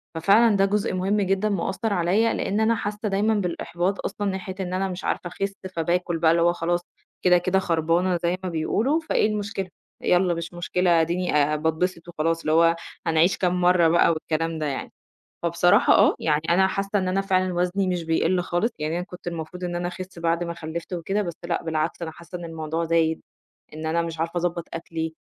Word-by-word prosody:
ففعلًا 205 +6 +4
ده 195 0 +4
جزء 205 0 0
مهم 195 +3 +1
جدًا 195 +2 +1
مأثّر 200 +3 -1
عليّا، 195 +6 +2
لإن 205 +2 -1
أنا 220 +1 +3
حاسّة 210 0 -3
دايمًا 205 +3 +2
بالإحباط 180 -1 -2
أصلًا 205 +1 -2
ناحية 190 0 -5
إن 180 -1 -3
أنا 190 +1 0
مش 180 0 -6
عارفة - - -1
أخسّ، 195 +3 -3 0.2
فباكل 170 +1 0
بقى 160 0 +4
اللي 170 - +2
هو 175 +1 +4
خلاص 175 +1 -1 0.4
كده، 180 -1 +6
كده 185 +2 +1
خربانة 170 +1 +1
زي 175 +2 +1
ما 185 - -2
بيقولوا، 215 - +1
فإيه 315 -9 +1
المشكلة؟ 205 -2 -3 0.3
يالّا 180 0 +3
مش 170 +1 -5
مشكلة، 175 -1 +2
آديني 170 0 -1
آآ 150 +1 +3
باتبسط 160 +3 -1
وخلاص، 165 0 -1
اللي 155 - -2
هو 165 +1 +5 0.3
هنعيش 165 +3 +3
كام 180 -1 0
مَرّة 175 -2 +5
بقى 170 +1 +4
والكلام 165 0 -1
ده 155 - -2
يعني، 140 -2 -4 0.5
فبصراحة 170 +1 +4
آه، - - +5
يعني 150 -1 +1
أنا 190 +3 +5
حاسّة 195 +1 -1
إن 185 -1 -1
أنا 190 +1 +1
فعلًا 185 -2 +1
وزني 180 +2 0
مش 180 -2 -1
بيقِل 165 +3 +1
خالص، 175 +6 0
يعني 155 +2 -2
أنا 175 - -2
كنت 180 -1 -13
المفروض 175 +1 -5
إن 175 -1 -3
أنا 175 0 -2
أخسّ 185 0 -8
بعد 170 +1 0
ما 170 0 -4
خلّفت 165 +1 -6
وكده، 195 +4 -1
بس 170 -4 -4
لأ، 170 0 -1
بالعكس 160 +1 -2
أنا 165 - -3
حاسّة 170 +2 -9
إن 175 - -8
الموضوع 160 0 -3
زايد، 160 -1 +1 0.5
إن 155 +1 -6
أنا 165 +2 +1
مش 165 -1 -5
عارفة 165 +2 -2
أضبّط 175 0 -2
أكلي، 165 -1 -4
175 Hz, 200 wpm, -24 LUFS, 165-190 Hz, 0.5 s, كده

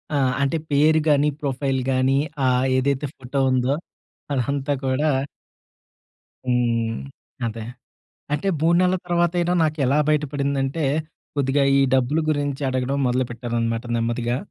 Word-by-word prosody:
ఆహ్, 130 -3 +2
అంటే 140 +3 +1
పేరు 155 +2 +4
గాని, 145 0 +4
ప్రొఫైల్ 135 -1 -1
గానీ 130 +1 +2 0.3
ఆ! - - +4 0.3
ఏదైతే 140 +2 0
ఫోటో 130 +2 -4
ఉందో 130 +2 +2 0.6
అదంతా 140 +2 0
కూడా 135 +4 +1 1.4
హ్మ్. 115 -2 +1 0.5
అదే. 115 0 -5 0.7
అంటే 150 +6 0
3 165 +2 +4
నెలల 185 0 +3
తర్వాతైనా 175 0 +1
నాకేలా 150 -3 +1
బయటపడిందంటే 140 0 0 0.5
కొద్దిగా 140 0 +2 0.2
ఈ - - +5
డబ్బులు 130 +5 +2
గురించి 145 -1 -1
అడగడం 130 +1 -1
మొదలుపెట్టారనమాట 120 -2 -1
నెమ్మదిగా. 115 +1 -1
135 Hz, 110 wpm, -23 LUFS, 125-150 Hz, 1.4 s, ఈ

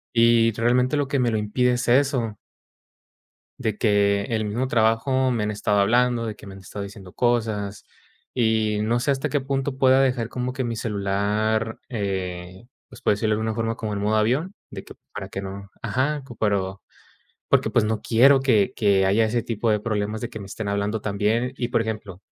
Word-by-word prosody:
y 115 0 +5
realmente 125 +5 +2
lo 145 -1 0
que 140 0 0
me 120 -2 +2
lo 110 - 0
impide 125 +4 +1
es 125 0 -2
eso. 125 -4 +2 1.2
De 110 -2 -2
que, 100 -2 +2
el 110 -2 -1
mismo 120 +5 -1
trabajo, 125 +3 +2
me 115 -3 0
han 105 - -1
estado 105 0 0
hablando, 120 +3 +2
de 110 -2 -4
que 105 - -13
me 95 - -9
han 95 - -11
estado 100 +2 -7
diciendo 100 -2 -10
cosas. 110 -5 -1 0.5
Y, 110 -3 +1
no 115 +3 +1
sé, 135 +4 +1
hasta 135 -1 -1
qué 145 - +1
punto 135 0 -2
pueda 130 0 +5
dejar, 125 -4 0
como 125 0 -3
que 130 - -2
mi 120 -1 -2
celular, 105 +1 -1
eh, 95 -3 -4 0.2
pues, - - -14
por - - +3
decirlo 105 +1 0
de - - -3
alguna 110 0 -1
forma, 115 0 -2
como 110 -2 -4
en 100 - -3
modo 105 +2 +1
avión 130 - +1 0.2
de - - -7
que - - -11 0.2
para - - -5
que 95 - -5
no 100 +1 -8
ajá, 130 +6 -1 0.2
pero, 100 -3 0 0.7
porque, - - +3
pues, - - +2
no 110 0 -1
quiero 135 +4 +5
que 110 -7 +2
que 100 -3 +3
haya 105 +4 +3
ese 115 +1 -1
tipo 115 0 -1
de 105 -1 +2
problemas, 105 +1 -2
de 120 - -4
que 110 - -8
me 100 - -8
estén 105 +2 -5
hablando 100 +2 -1
también. 110 +5 0
Y, 120 -2 -3
por - - +2
ejemplo, 105 -4 -5
110 Hz, 200 wpm, -24 LUFS, 105-120 Hz, 1.2 s, y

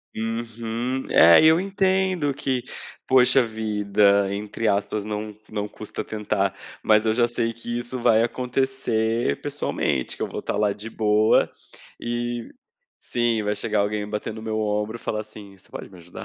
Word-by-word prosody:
Uhum, 115 +3 -3
é, 85 +1 +7
e - - +8
eu 160 +2 +5
entendo 190 -6 +1
que, 130 -2 -1 0.5
poxa 130 +1 +5
vida, 105 -3 +2
entre 105 +2 -3
aspas 100 +1 0
não 105 0 -5
não 105 -1 -3
custa 105 0 -7
tentar, 100 -3 -1 0.3
mas 110 0 +4
eu 110 - +2
já 120 -1 +3
sei 115 -1 -1
que 120 +1 -5
isso 120 +1 -5
vai 115 -2 +4
acontecer 120 - -1
pessoalmente, 65 -2 -2
que - - -13
eu - - 0
vou - - -5
estar - - -3
lá 105 0 +2
de 105 +3 -7
boa, 110 -1 +3 0.5
e 120 0 -3 0.5
sim 120 -2 0
vai 105 0 0
chegar 105 0 0
alguém 105 0 -1
batendo 105 +1 -4
o 110 - -8
meu 110 -1 -2
ombro 105 +1 -1
e - - -11
falar 110 -2 -3
assim, 105 -2 -11
você 95 - -22
pode - - -9
me 90 - -14
ajudar? 85 +1 -10
110 Hz, 170 wpm, -24 LUFS, 105-120 Hz, 0.5 s, e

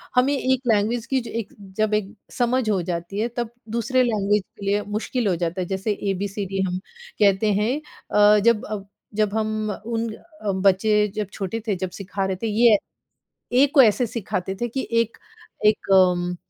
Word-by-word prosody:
हमें 255 +3 +4
एक 260 -2 +1
लैंग्वेज 225 +1 +1
की 265 - +4
जो - - -7
एक 210 - -7 0.2
जब 215 -1 +1
एक 210 -1 -1 0.2
समझ 245 -1 +1
हो 195 -3 +2
जाती 175 +4 -3
है 225 - +1
तब 240 -2 -1 0.3
दूसरे 255 +2 +2
लैंग्वेज 210 -3 +1 0.2
के 200 - -6
लिए 200 +1 +1 0.2
मुश्किल 235 +1 -1
हो 185 - +2
जाता 170 +2 -2
है। 180 - -3
जैसे 195 +3 -1 0.2
एबीसीडी 195 0 -3
हम 180 0 -2 0.4
कहते 205 +1 +4
हैं 215 +7 +1 0.3
अ, 210 0 +6
जब 225 0 +3
अ, 215 -1 -4 0.3
जब 210 -1 +1
हम 215 0 -1 0.2
उन 230 0 -1 0.5
बच्चे 210 +2 +3
जब 210 -2 -3
छोटे 205 +3 -3
थे 205 - +1
जब 185 0 -3
सिखा 195 0 -3
रहे 190 0 -1
थे - - +1
ये 220 0 +5 0.7
ए, 255 +3 +6
को 280 -1 +6
ऐसे 235 +2 +4
सिखाते 190 -4 -3
थे 240 - +1
कि 265 +3 -3
एक 230 -1 +1 0.5
एक 210 -2 +2
अम्म, 180 -1 +4
210 Hz, 180 wpm, -23 LUFS, 195-230 Hz, 0.7 s, अ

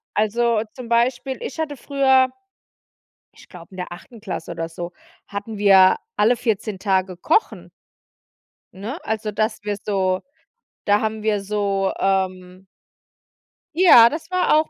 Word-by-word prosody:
A 210 - +2
also, 230 +1 +1
zum 250 -3 -9
Beispiel, 245 +2 0
ich 280 - -6
hatte 295 -3 -3
früher, 265 -1 +3 1.1
ich - - -18
glaube 175 -2 -12
in 185 - -13
der 180 -1 -6
9. 205 +5 -12
Klasse 185 -5 -6
oder 165 -1 -4
so, 175 +1 -7 0.3
hatten 205 +2 -6
wir 195 -2 +6 0.2
alle 220 +4 +3
14 215 -3 -2
Tage 190 -2 0
kochen. 325 - 0 1.1
Ne, 215 +10 -6
also, 220 -1 -2
dass 215 +2 -1
wir 205 -1 -3
so 190 -2 0 0.6
da 205 0 +3
haben 220 0 -2
wir 210 -2 0
so, 200 -1 -1
ähm 185 -1 -2 1.1
Ja, 325 -10 +8
das 315 +3 -7
war 365 0 +2
auch 310 +1 +2
210 Hz, 145 wpm, -21 LUFS, 190-240 Hz, 1.1 s, Ja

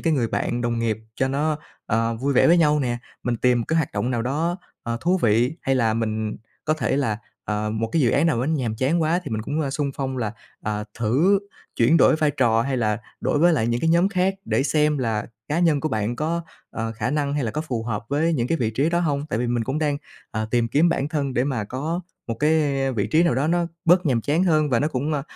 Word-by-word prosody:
cái 165 - +1
người 120 -6 +1
bạn 120 +2 -1
đồng 120 -1 -1
nghiệp 110 -2 0 0.2
cho 130 - 0
nó, 150 +3 0 0.3
ờ, 115 +1 +1
vui 135 +5 0
vẻ - - +5
với 170 +2 +6
nhau 150 -2 +4
nè, 120 -3 -1 0.2
mình 120 -1 -1
tìm 125 +1 +3
một - - -2
cái 160 - +1
hoạt 160 -5 0
động 125 - -1
nào 120 -2 0
đó, 160 +7 -1 0.3
ờ, 115 0 -2
thú 180 +2 +2
vị 120 +7 +2
hay 135 - +1
là 115 -4 +2
mình 110 -1 -2 0.3
có 155 - +2
thể 150 - 0
là, 110 -7 0 0.3
ờ, 105 0 -2
một 110 +1 -2
cái 160 - +2
dự 120 - +4
án 145 +5 +3
nào 125 -8 +1
á, 130 - -1
nhàm 125 -8 -1
chán 150 +8 +1
quá 165 +3 +1
thì - - -6
mình 110 -1 -2
cũng, 150 +7 -2
a, 140 - -1
xung 140 0 -1
phong 135 -1 -3
là, 110 -4 -2 0.3
à, 105 0 -2
thử 145 - +3 0.4
chuyển 120 +8 +4
đổi - - +5
vai 155 -1 +2
trò 115 -5 +2
hay 135 0 -1
là 110 -3 0 0.2
đổi - - +1
với 175 +3 +5
lại 125 -8 +1
những 120 +1 0
cái 165 - +2
nhóm 170 +3 +4
khác, 190 -1 +1
để 135 - +1
xem 150 +1 +2
là 110 -4 -1 0.2
cá 150 - 0
nhân 165 -5 +3
của 155 - -1
bạn 110 -1 -1
có, 165 +4 -1 0.3
ờ, 115 0 -3
khả 115 +2 -2
năng 145 -1 0
hay 145 - 0
là 115 - -1
có 150 - -3
phù 125 -8 -3
hợp 115 -1 -3
với 155 +4 +1
những 125 -7 0
cái 165 - +1
vị 110 -2 0
trí 140 +8 +1
đó 170 0 +1
hông. 145 -3 -1
Tại 130 - -2
vì 125 - 0
mình 120 -1 0
cũng 130 +6 -2
đang, 150 -2 0 0.3
à, 110 0 -2
tìm 120 -1 +1
kiếm 150 +8 +3
bản 145 -4 0
thân 145 -4 -1
để 125 - +2
mà 130 -7 -1
có 150 - -3 0.3
một 115 - -2
cái 145 -2 +1
vị 105 -5 -1
trí 160 +2 +3
nào 170 -7 +2
đó 135 +4 +1
nó 170 +1 +1 0.2
bớt 175 +1 +4
nhàm 125 -5 +2
chán 150 +9 +1
hơn, 155 -4 +2
và 120 - +2
nó 150 - +1
cũng, 145 +2 -2
ơ, 140 -2 -1
135 Hz, 265 wpm, -23 LUFS, 115-155 Hz, 0.4 s, với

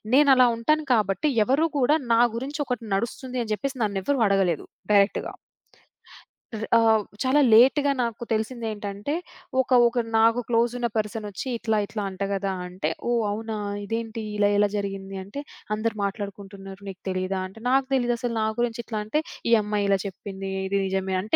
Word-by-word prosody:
నేనలా 270 -3 +6
ఉంటాను 305 +7 +1
కాబట్టి 210 - +1 0.2
ఎవరు 285 +7 +3
కూడా 290 +5 +4 0.2
నా 230 - +5 0.2
గురించి 285 +5 -4
ఒకటి 245 -3 -3
నడుస్తుంది 250 +4 -3
అని 220 - -6
జెప్పేసి 270 +6 -3
నన్ను 200 -2 -1
ఎవరు 285 +6 +1
అడగలేదు 195 -5 +1 0.3
డైరెక్ట్‌గా. 200 0 +3 1.3
ర్ - - -4
ఆహ్, 220 -2 +4 0.2
చాలా 275 +3 +4
లేట్‌గా 270 +5 +6
నాకు 235 -1 -3
తెలిసిందేంటంటే, 220 0 -3 0.5
ఒక 250 - -7 0.2
ఒక 240 +1 -3 0.2
నాకు 225 +2 +4
క్లోజున్న 240 +1 +1
పర్సనొచ్చి 210 -1 -3
"ఇట్లా 220 -1 0
ఇట్లా 210 0 -5
అంట 190 +1 -5
గదా!" 195 0 -1
అంటే 180 -3 -3 0.2
ఓహ్! 240 -1 +2
అవునా? 220 +1 -4 0.3
ఇదేంటి 225 +1 -4
ఇలా 205 0 +4
ఎలా 205 0 +4
జరిగింది? 195 -1 -4
అంటే 240 +9 -7 0.3
"అందరూ 220 +1 -2
మాట్లాడుకుంటున్నారు 200 -1 -7
నీకు 190 0 -10
తెలీదా?" 185 +1 -1
అంటే 225 +3 -14
నాకు 265 0 +3
తెలీదసలు 240 -1 0
నా - - +2
గురించి 235 -1 0
ఇట్లా 215 -2 -3
అంటే, 300 +8 0 0.3
ఈ - - +6
అమ్మాయి 205 -1 -1
ఇలా 195 -1 +3
చెప్పింది 195 0 -7 0.2
ఇది 200 +1 0
నిజమే 190 0 -1
అంటే 210 +3 0
220 Hz, 155 wpm, -25 LUFS, 200-245 Hz, 1.3 s, నేనలా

